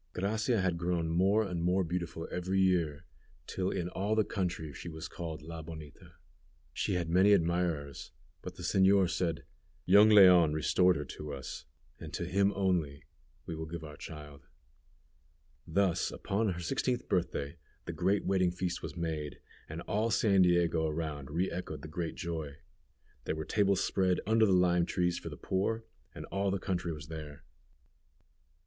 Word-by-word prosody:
Gracia 110 +4 0
had 90 -2 0
grown 85 -2 0
more 95 +6 +3
and 90 -4 -3
more 90 +2 +2
beautiful 85 -1 -4
every 95 +2 -1
year, 85 -4 +1 0.4
till 95 0 -2
in 85 - -2
all 100 +4 -1
the 110 - +4
country 85 -7 -3
she 85 - -7
was 80 0 -7
called 80 -3 -6
La 80 0 -7
Bonita. 80 -3 -11 0.6
She - - -1
had 85 -2 -1
many 95 +5 +5
admirers, 85 -6 0 0.3
but - - -8
the - - -9
señor 95 0 +4
said, 85 -3 -2 0.4
"Young 100 +4 +7
Leon 90 -6 +7
restored 90 +4 +3
her 75 - -3
to 75 +2 -7
us, 65 -1 -7 0.3
and - - -8
to - - -3
him 100 +1 +2
only 90 -8 0 0.4
will 80 -1 -5
we 80 - -8
give 85 -2 -5
our 75 -1 -9
child." 75 -3 -10 1.2
Thus, 90 0 +1
upon 100 0 -1
her 85 - -7
sixteenth 125 +6 -1
birthday, 85 -4 -1 0.3
the - - -4
great 95 +3 +1
wedding 95 -2 +2
feast 90 0 -3
was - - -7
made, 80 -3 -3 0.3
and 80 +2 -6
all 110 +4 0
San 100 -4 +3
Diego 85 -2 +3
around 75 -3 -4
re 85 +5 -1
echoed 85 -4 -5
the - - -6
great 80 +2 -4
joy. 80 -5 -4 0.7
There - - -1
were 80 0 -4
tables 100 -3 +2
spread 95 -2 +1
under 110 +1 +4
the - - +2
lime 90 -2 +3
trees 90 -1 0
for - - -7
the - - -9
poor, 110 +4 -1 0.3
and - - -7
all 100 +1 0
the 100 - 0
country 90 -3 -2
was 75 -2 -7
there. 75 -3 -8
90 Hz, 165 wpm, -31 LUFS, 80-95 Hz, 1.2 s, Young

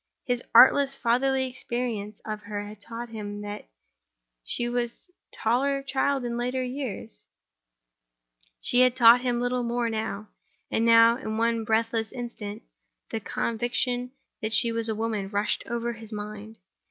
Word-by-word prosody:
His 245 -1 -1
artless, 275 +1 +7
fatherly 260 +2 +1
experience 235 -5 -4
of 215 -1 -4
her 205 0 -5
had 205 0 -11
taught 235 +2 -7
him 205 -2 -6
that 205 - -7 0.7
she 240 - -1
was 240 +7 -3
a - - -43 0.2
taller 275 +5 +1
child 275 -1 0
in 235 0 -3
later 250 +2 -1
years—and - - -6
had 255 -1 +5
taught 240 -1 +7
him 245 -2 0
little 245 +1 0
more. 240 0 -1
And 220 -3 -2 0.7
now, 230 0 +7
in 220 -4 -4
one 230 0 +1
breathless 225 0 0
instant, 230 -4 -6 0.5
the 225 - -2
conviction 245 +3 -1 0.3
that 215 0 -2
she 235 - +4
was 230 0 0
a 220 - 0
woman 215 -3 -2
rushed 205 +1 0
over 235 0 -2
his 225 -1 -9
mind. 210 +1 -7
230 Hz, 140 wpm, -26 LUFS, 210-245 Hz, 0.7 s, artless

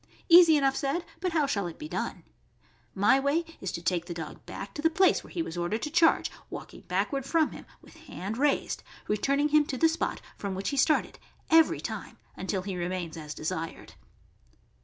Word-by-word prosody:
Easy 335 -2 +9
enough 270 -1 +2
said, 285 +5 -1
but 360 0 -2
how 310 -3 +3
shall 200 -9 -1
it 170 - -8
be 305 - -7
done? - - -4 0.7
My 205 +7 +4
way 285 +5 +1 0.2
is 190 - -3
to 170 - -5
take 175 -1 0
the 170 - -5
dog 165 -2 -7
back - - -7
to 295 - -5
the 325 - +4
place 375 +4 +3
where - - -13
he 340 - -2
was 175 - -5
ordered 175 +6 -1
to 300 - -3
charge, 330 0 +4 0.2
walking - - -9
backward 275 -2 -1
from 315 +3 +2
him, - - -11 0.2
with - - -16
hand 205 +6 -5
raised, 290 0 +1 0.3
returning 275 +8 +1
him 300 0 +5
to 270 - -4
the 325 - +5
spot 325 +1 -1 0.2
from 200 -2 -4
which 195 +1 -2
he - - -2
started 305 +3 +2 0.3
every 325 0 +5
time - - -6 0.2
until 190 0 -3
he 195 -1 -4
remains 175 -1 -3
us 150 -2 -7
desired. 160 +1 -5
275 Hz, 200 wpm, -28 LUFS, -, 0.7 s, Easy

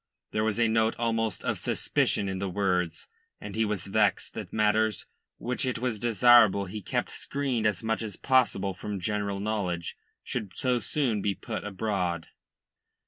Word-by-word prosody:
There 110 - 0
was 110 +1 0
a 115 - +4
note 110 0 +2
almost 115 -1 -1
of - - -1
suspicion 100 - 0
in 95 -1 -3
the 100 0 -2
words, 90 -3 -1 0.3
and 100 - -7
he 110 - +2
was 105 -4 -2
vexed 105 +1 +1
that - - -6
matters 110 0 +2 0.3
which 125 +1 -2
it 130 -2 0
was 120 -3 -2
desirable 115 -3 +5
be 105 +3 -6
kept - - -2
screened 130 -6 -1
as 105 0 -1
much 110 0 0
as 110 -3 -4
possible 125 -7 +2
from 100 +2 -5
general 100 +1 -2
knowledge 95 -4 -2 0.3
should 105 -7 -5
so 125 -1 +1
soon 120 -6 0
be 100 0 0
put 110 -5 -5
abroad. 95 -5 -2
105 Hz, 165 wpm, -28 LUFS, 100-115 Hz, 0.3 s, desirable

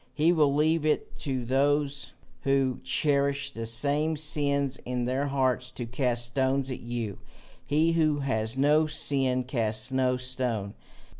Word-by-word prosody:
He 160 +3 +3
will 150 -5 +3
leave 155 +2 +2
it 155 -1 -1
to 130 -4 -3
those 140 +2 0 0.3
who 135 -2 +1
cherish 140 +1 +1
the 115 -3 -5
same 145 +7 0
sins 140 -3 0
in 125 -1 -3
their 130 +3 -1
hearts 130 -2 0
to 120 - -5
cast 120 0 +1
stones 130 +2 0
at 125 - -5
you: 120 -4 -4 0.5
he 155 +3 +2
who 155 -3 +1
has 115 -3 -1
no 150 +3 +3
sin 135 -4 0
casts 115 -2 -1
no 130 -1 +1
stone. 125 -5 -2
135 Hz, 145 wpm, -27 LUFS, 125-145 Hz, 0.5 s, He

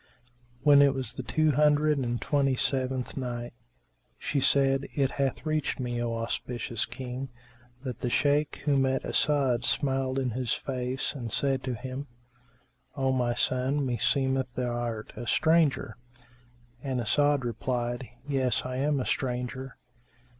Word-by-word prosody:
When 145 -1 +7
it 140 -1 +5
was 130 -1 0
the - - -4
Two 155 +7 +2
Hundred 150 +1 +3
and 120 -2 -1
Twenty 140 -2 +1
seventh 130 -1 0
Night, 120 -2 -4 0.6
She 145 - -1
said, 135 0 +3
It 135 -2 +2
hath 140 +2 -1
reached 155 -3 -1
me, 120 -2 -2
O 115 -1 -1
auspicious 115 0 -2
King, 130 +1 -6 0.5
that 125 -4 -5
the 125 - -1
Shaykh 145 +3 +1
who 145 -2 +3
met 135 0 +1
As'ad 135 -5 +2
smiled 135 0 +1
in 130 -2 0
his 125 0 -1
face 130 0 -2
and 120 -6 -6
said 135 +1 0
to 130 -2 -2
him, 130 +4 -6 0.9
"O 135 -1 +2
my 120 -2 +1
son, 130 +3 +1
meseemeth 130 +1 +1
thou 125 -1 -1
art 115 -3 -4
a 120 - -6
stranger?" 160 -7 +2 0.8
and 130 -2 -2
As'ad 145 +5 +2
replied, 120 +1 -2 0.2
"Yes, 130 -3 +1
I 130 0 -3
am 145 +1 +1
a 125 - -2
stranger." 125 0 -3
130 Hz, 145 wpm, -28 LUFS, 125-140 Hz, 0.9 s, When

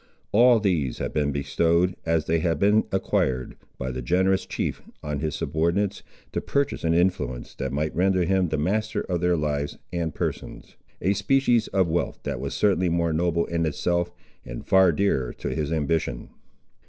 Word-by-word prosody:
All 120 +2 +6
these 85 - 0
had - - -4
been 75 -1 +1
bestowed, 85 +5 +1
as 80 -2 +1
they 80 0 +1
had 80 0 0
been 105 +2 +3
acquired, 65 -9 0 0.2
by 65 - -3
the 65 0 -4
generous 95 +8 +1
chief, - - -3 0.2
on 75 -1 -3
his 75 0 -2
subordinates, 90 +6 0 0.3
to - - -2
purchase 140 -1 -1
an 85 0 +2
influence 85 -9 0
that 65 -1 -4
might 75 +3 -2
render 95 +1 +2
him 95 +1 +2
the 80 - -1
master 105 +8 0
of 90 -2 -2
their 90 -1 +2
lives 75 -2 -2 0.2
and 85 -2 -1
persons; - - -5 0.3
a 95 +4 +3
species 120 -1 +2
of 95 -2 +1
wealth 85 +1 -1
that - - -3
was - - -4
certainly 95 -3 +2
more 85 -1 +1
noble 85 +1 +1
in 85 -1 -1
itself, 85 +3 0 0.3
and - - -8
far 95 -2 +5
dearer 75 -8 0
to - - -5
his 75 0 -2
ambition. 75 -6 -1
85 Hz, 175 wpm, -25 LUFS, 75-95 Hz, 0.3 s, All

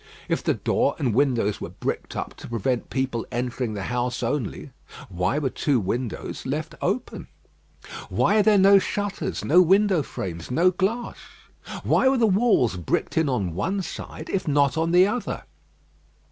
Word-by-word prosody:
If - - 0
the - - +1
door - - +1
and 125 -6 0
windows 120 -5 +1
were - - -5
bricked - - -4
up - - -4
to - - -10
prevent 120 +2 -2
people 130 -3 -2
entering 120 -2 -2
the 100 - -4
house 125 +1 -2
only, 120 -1 -3 0.4
why 90 +8 -1
were 140 -4 -1
two 140 -5 +1
windows 115 +4 -4
left 150 +4 -3
open? 205 +8 -2 0.8
Why 210 - +2
are - - +6
there 210 0 +4
no 195 +1 +7
shutters, 205 +1 -3
no 175 +5 +6
window 190 0 +4
frames, 85 - -6
no 170 +8 +3
glass? 205 +7 -2 0.7
Why 265 - +3
were 270 - +2
the 235 - +3
walls 195 - +3
bricked 85 - -2
in 160 -3 +2
on 100 -10 -1
one 190 - -1
side 160 -2 -7
if 185 -3 -2
not 140 -3 +3
on 165 +1 0
the 180 +2 +6
other? 220 +5 -3
145 Hz, 165 wpm, -24 LUFS, 120-190 Hz, 0.8 s, no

